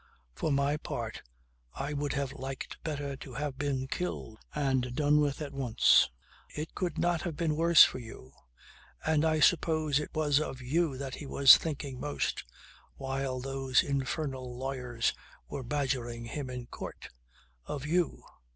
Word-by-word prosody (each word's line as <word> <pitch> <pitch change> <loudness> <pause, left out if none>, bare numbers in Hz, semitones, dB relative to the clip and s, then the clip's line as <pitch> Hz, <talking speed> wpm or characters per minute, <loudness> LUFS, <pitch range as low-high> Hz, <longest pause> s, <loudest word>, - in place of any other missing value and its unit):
For 155 - -1
my 140 +1 +2
part - - -5 0.5
I 140 +2 -3
would 145 0 -1
have 140 -2 -2
liked 135 0 -6
better 145 -3 -3
to 130 -3 -10
have 140 -1 -3
been 140 -2 -1
killed 130 -8 -4 0.2
and 130 -4 0
done 150 +1 +4
with 145 0 0
at 145 - -7
once. 130 -5 +4 0.4
It 155 +2 -6
could 180 -2 -2
not 175 -2 +1
have 170 -3 -3
been 160 -3 0
worse 170 +1 +8
for - - +1
you 115 - -11 0.7
and 155 -1 +3
I 160 -1 +2
suppose 155 -3 +3
it 150 - -4
was 150 -2 +3
of 135 -4 -4
you 140 +2 0
that 135 -1 -5
he 145 - -7
was 135 0 +9
thinking 140 -4 -4
most 145 0 -2 0.5
while 135 -1 -3
those 135 0 +1
infernal 135 -2 -3
lawyers 125 -3 -1 0.3
were 140 - -5
badgering 125 -3 -2
him 130 +3 -5
in 125 -1 -5
court. - - -8 0.6
Of 145 -1 -4
you. 170 +2 0
140 Hz, 155 wpm, -30 LUFS, 130-150 Hz, 0.7 s, was